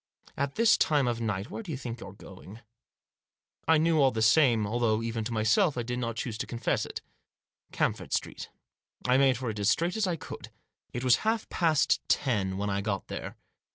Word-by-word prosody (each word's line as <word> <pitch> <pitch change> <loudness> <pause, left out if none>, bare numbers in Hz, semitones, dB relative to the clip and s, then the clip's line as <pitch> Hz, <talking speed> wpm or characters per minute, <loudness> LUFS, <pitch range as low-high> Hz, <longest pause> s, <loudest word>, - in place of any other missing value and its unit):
At 140 0 -2
this 225 -1 +4
time 145 -4 +2
of 120 -1 -1
night, 110 -1 -3
where - - -5
do 205 - -11
you 140 - -3
think 120 -3 -6
you're 100 - -9
going? 100 +2 -13 0.5
" - - -49
I 160 - +5
knew 160 0 +3
all 135 - +5
the 110 -3 -1
time, 115 -2 +4
although 115 0 0
even 115 -1 -3
to 120 - -4
myself 115 - +2
I 120 - -1
did 125 +1 -3
not 115 -2 -3
choose 115 -1 -4
to - - -3
confess 120 - -1
it - - -7 0.4
— - - -48
Camford - - -1
Street. - - -3 0.6
I 125 +1 +4
made 135 -2 +4
for 125 -2 -3
it 105 - -7
as 100 +1 +2
straight 170 +8 +1
as 220 -3 0
I 175 - 0
could. 160 - -9 0.4
It 120 - -4
was 125 -1 +5
past - - -10 0.2
half - - -26
past 160 -4 +2
ten 100 -9 +1
when 100 0 -2
I 100 0 -1
got 100 -2 -3
there. - - -6
120 Hz, 220 wpm, -28 LUFS, 110-140 Hz, 0.6 s, I